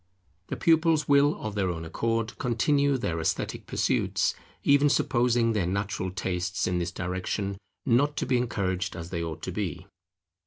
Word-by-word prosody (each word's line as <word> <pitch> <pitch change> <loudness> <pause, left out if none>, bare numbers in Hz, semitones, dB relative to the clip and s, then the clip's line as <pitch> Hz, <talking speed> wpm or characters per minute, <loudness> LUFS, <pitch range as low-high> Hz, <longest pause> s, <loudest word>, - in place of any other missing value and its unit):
The - - -3
pupils 160 -2 +3
will 145 +1 +4
of 110 -1 -4
their 100 -3 0
own 80 -2 -4
accord 115 +6 -2
continue 140 +3 +2
their 100 -9 -2
esthetic 80 - -2
pursuits, - - +1 0.3
even 145 +1 +5
supposing 120 -4 +2
their 100 -5 0
natural 95 0 -2
tastes 90 0 -2
in 90 -1 0
this 85 0 -2
direction 95 +2 -3 0.3
not 140 +4 +2
to - - 0
be 130 - +2
encouraged 100 -5 -1
as 85 -1 -7
they 85 -2 -2
ought 80 -2 -6
to 95 - -3
be. 90 -2 -4
105 Hz, 160 wpm, -27 LUFS, 90-130 Hz, 0.3 s, even